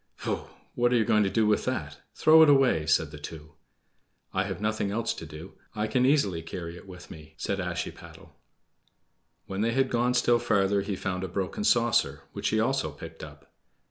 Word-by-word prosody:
"Pooh! -, -, -4 dB, 0.3 s
what 120 Hz, 0 st, +2 dB
are -, -, +3 dB
you 115 Hz, -2 st, +3 dB
going 105 Hz, -, +3 dB
to 100 Hz, -, +2 dB
do 110 Hz, +2 st, +2 dB
with 105 Hz, -1 st, +2 dB
that? 75 Hz, -, -3 dB, 0.2 s
Throw 160 Hz, +1 st, +6 dB
it 160 Hz, -, +7 dB
away," 130 Hz, -, +4 dB
said 80 Hz, -1 st, +2 dB
the 75 Hz, -, -10 dB
two. 75 Hz, +1 st, -10 dB, 0.8 s
"I 95 Hz, 0 st, 0 dB
have 95 Hz, -2 st, -5 dB
nothing 105 Hz, -1 st, -1 dB
else 115 Hz, +3 st, -1 dB
to 80 Hz, -, -9 dB
do. 75 Hz, +1 st, -10 dB, 0.2 s
I 105 Hz, -, -1 dB
can 125 Hz, +4 st, +2 dB
easily 105 Hz, -, +2 dB
carry 85 Hz, +1 st, -7 dB
it 90 Hz, -, -13 dB
with 90 Hz, -1 st, -12 dB
me," 80 Hz, -1 st, -12 dB
said 100 Hz, +4 st, -2 dB
Ashiepattle. 90 Hz, -3 st, -6 dB, 1.1 s
When 95 Hz, +1 st, -4 dB
they 115 Hz, +1 st, +1 dB
had 135 Hz, +1 st, +1 dB
gone 125 Hz, +1 st, +1 dB
still 120 Hz, -1 st, +3 dB
farther 100 Hz, -4 st, +2 dB
he 100 Hz, 0 st, -3 dB
found 95 Hz, -1 st, -3 dB
a -, -, -2 dB
broken 95 Hz, -, -3 dB
saucer, 120 Hz, -, +2 dB
which -, -, -2 dB
he 110 Hz, -, +1 dB
also 135 Hz, +4 st, 0 dB
picked -, -, -10 dB
up. -, -, -13 dB
100 Hz, 200 wpm, -27 LUFS, 90-120 Hz, 1.1 s, it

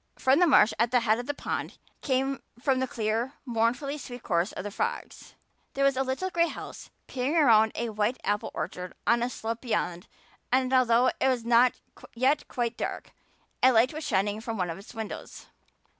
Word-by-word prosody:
From 265 Hz, +3 st, +3 dB
the 355 Hz, -, +5 dB
marsh 230 Hz, -7 st, +5 dB
at 235 Hz, -, +3 dB
the 250 Hz, 0 st, +3 dB
head 225 Hz, 0 st, +2 dB
of 245 Hz, -, -6 dB
the 290 Hz, -, -1 dB
pond -, -, -4 dB, 0.2 s
came 270 Hz, 0 st, 0 dB, 0.2 s
the 260 Hz, 0 st, 0 dB
clear, 225 Hz, +4 st, -1 dB
mournfully 245 Hz, +5 st, 0 dB
sweet 245 Hz, -2 st, -9 dB
chorus 175 Hz, 0 st, 0 dB
of -, -, -6 dB
the 205 Hz, -, -5 dB
frogs. 465 Hz, -, -4 dB, 0.4 s
There 275 Hz, -, +1 dB
was 275 Hz, -1 st, +3 dB
a 260 Hz, -, 0 dB
little 270 Hz, +9 st, -2 dB
gray 340 Hz, -1 st, +2 dB
house -, -, -8 dB, 0.2 s
peering 265 Hz, +4 st, -2 dB
around 220 Hz, -8 st, +5 dB
a 235 Hz, 0 st, -2 dB
white 215 Hz, +3 st, 0 dB
apple 205 Hz, 0 st, -1 dB
orchard 180 Hz, +2 st, -5 dB
on 235 Hz, 0 st, +3 dB
a 240 Hz, -, 0 dB
slope 230 Hz, -1 st, -5 dB
beyond 180 Hz, -6 st, -2 dB, 0.4 s
and, 255 Hz, +1 st, +2 dB
although 250 Hz, -1 st, +4 dB
it -, -, +2 dB
was 250 Hz, -3 st, 0 dB
not 240 Hz, +1 st, +4 dB, 0.4 s
yet 270 Hz, +5 st, +1 dB
quite 240 Hz, -1 st, -2 dB
dark, -, -, -4 dB, 0.5 s
a 260 Hz, -, +7 dB
light 240 Hz, +3 st, +3 dB
was 310 Hz, +1 st, -5 dB
shining 205 Hz, 0 st, 0 dB
from 230 Hz, -1 st, -4 dB
one 180 Hz, -3 st, -1 dB
of 165 Hz, -, -7 dB
its 205 Hz, +4 st, -13 dB
windows. 220 Hz, -1 st, -7 dB
245 Hz, 190 wpm, -27 LUFS, 220-265 Hz, 0.5 s, a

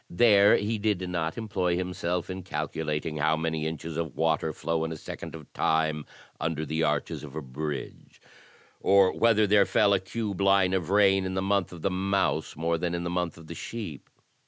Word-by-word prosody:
There 100 Hz, +1 st, +6 dB
he 110 Hz, +1 st, -1 dB
did 100 Hz, -3 st, 0 dB
not 85 Hz, -3 st, -2 dB
employ 95 Hz, -6 st, -1 dB
himself 90 Hz, 0 st, -2 dB
in 95 Hz, 0 st, -5 dB
cal 95 Hz, -, -3 dB
ctilating 75 Hz, 0 st, -3 dB
how 80 Hz, +1 st, +2 dB
many 80 Hz, -1 st, -1 dB
inches 80 Hz, 0 st, -5 dB
of 80 Hz, -5 st, -3 dB
water -, -, +1 dB
flow 80 Hz, -1 st, -2 dB
in 80 Hz, -, -3 dB
a 80 Hz, -, -5 dB
second -, -, -8 dB
of 75 Hz, -3 st, -12 dB
time 80 Hz, -1 st, 0 dB, 0.3 s
under 80 Hz, -1 st, -2 dB
the 80 Hz, +2 st, -2 dB
arches 75 Hz, 0 st, -1 dB
of 75 Hz, -1 st, -9 dB
a 80 Hz, -, -3 dB
bridge, 70 Hz, +2 st, -6 dB, 0.6 s
or 100 Hz, -1 st, +4 dB
whether 110 Hz, -2 st, +4 dB
there 100 Hz, -1 st, +4 dB
fell 100 Hz, -, +4 dB
a 100 Hz, -, +3 dB
cube 100 Hz, 0 st, -4 dB
line 95 Hz, -1 st, +4 dB
of 90 Hz, -3 st, -1 dB
rain 95 Hz, -1 st, +4 dB
in 95 Hz, 0 st, -3 dB
the 95 Hz, -, 0 dB
month 100 Hz, -1 st, +1 dB
of 85 Hz, -3 st, -10 dB
the 95 Hz, -, +1 dB
Mouse 95 Hz, +1 st, 0 dB
more 85 Hz, +2 st, 0 dB
than 85 Hz, 0 st, -1 dB
in 85 Hz, -, -3 dB
the 85 Hz, -, -3 dB
month 90 Hz, -2 st, -2 dB
of 80 Hz, -, -12 dB
the 85 Hz, -, -7 dB
Sheep. 85 Hz, -4 st, -7 dB
85 Hz, 205 wpm, -27 LUFS, 80-100 Hz, 0.6 s, There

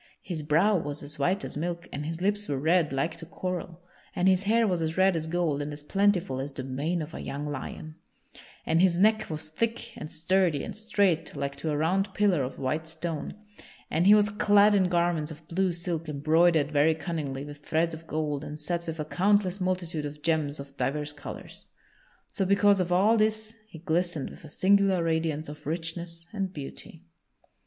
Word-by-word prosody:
His 170 Hz, -4 st, -4 dB
brow 165 Hz, +8 st, +3 dB
was 145 Hz, -3 st, -4 dB
as 145 Hz, +2 st, -8 dB
white 190 Hz, +3 st, +1 dB
as -, -, -6 dB
milk 170 Hz, +3 st, -3 dB
and 150 Hz, +1 st, -4 dB
his 165 Hz, +1 st, -4 dB
lips 205 Hz, +1 st, +1 dB
were 140 Hz, -, -1 dB
red 160 Hz, +3 st, +2 dB
like 135 Hz, +5 st, -1 dB
to 165 Hz, -, -8 dB
coral 180 Hz, -1 st, -5 dB, 0.3 s
and 180 Hz, -, +2 dB
his 190 Hz, -1 st, +4 dB
hair 225 Hz, +3 st, +3 dB
was 180 Hz, -4 st, 0 dB
as 160 Hz, +1 st, -2 dB
red 190 Hz, -1 st, +4 dB
as 160 Hz, -1 st, -2 dB
gold 160 Hz, -4 st, 0 dB
and 145 Hz, +1 st, -4 dB
as 145 Hz, 0 st, -8 dB
plentiful 190 Hz, -6 st, +1 dB
as 140 Hz, +2 st, -4 dB
the 135 Hz, -, -6 dB
mane 150 Hz, +6 st, -2 dB
of 155 Hz, +2 st, -9 dB
a -, -, -6 dB
young 145 Hz, +2 st, -4 dB
lion, 150 Hz, +2 st, -6 dB, 0.7 s
and 165 Hz, +1 st, +3 dB
his 180 Hz, -2 st, +3 dB
neck 215 Hz, +2 st, +3 dB
was 155 Hz, -1 st, -5 dB
thick 230 Hz, +7 st, -2 dB
and 155 Hz, -, -7 dB
sturdy 165 Hz, -2 st, +1 dB
and -, -, -6 dB
straight 200 Hz, -7 st, +1 dB
like 140 Hz, 0 st, -3 dB
to 155 Hz, -, -3 dB
a 150 Hz, -, 0 dB
round 190 Hz, +5 st, 0 dB
pillar 200 Hz, -7 st, +3 dB
of 130 Hz, 0 st, -4 dB
white 155 Hz, +5 st, -2 dB
stone, 160 Hz, -1 st, -4 dB, 0.6 s
and 170 Hz, +4 st, +2 dB
he 210 Hz, -, +9 dB
was 210 Hz, 0 st, +4 dB
clad 205 Hz, 0 st, +5 dB
in 190 Hz, -3 st, +3 dB
garments 170 Hz, -3 st, +1 dB
of 155 Hz, 0 st, -11 dB
blue 185 Hz, +3 st, +1 dB
silk 170 Hz, -2 st, -4 dB
embroidered 155 Hz, +1 st, +3 dB
very 150 Hz, +2 st, +4 dB
cunningly 150 Hz, -5 st, -4 dB
with 145 Hz, 0 st, -9 dB
threads 165 Hz, +2 st, +1 dB
of 160 Hz, +1 st, -9 dB
gold 150 Hz, -2 st, -2 dB
and 150 Hz, 0 st, -7 dB
set 170 Hz, +3 st, -3 dB
with 165 Hz, 0 st, -4 dB
a 150 Hz, -, -2 dB
countless 195 Hz, +2 st, +2 dB
multitude 175 Hz, -4 st, -1 dB
of 150 Hz, 0 st, -11 dB
gems 155 Hz, -3 st, 0 dB
of 140 Hz, 0 st, -9 dB
divers 150 Hz, +1 st, -1 dB
colors. 145 Hz, -, -9 dB, 0.7 s
So 200 Hz, -, 0 dB
because 200 Hz, +1 st, +4 dB
of 180 Hz, -1 st, -1 dB
all 205 Hz, +6 st, +4 dB
this 220 Hz, 0 st, 0 dB
he 190 Hz, -, -11 dB
glistened 170 Hz, -2 st, -1 dB
with -, -, -13 dB
a 155 Hz, -, -10 dB
singular 190 Hz, +1 st, +3 dB
radiance 160 Hz, -2 st, 0 dB
of 150 Hz, -1 st, -9 dB
richness 165 Hz, +1 st, -4 dB
and 195 Hz, -3 st, -2 dB
beauty. 155 Hz, +1 st, -9 dB
165 Hz, 200 wpm, -28 LUFS, 150-185 Hz, 0.7 s, he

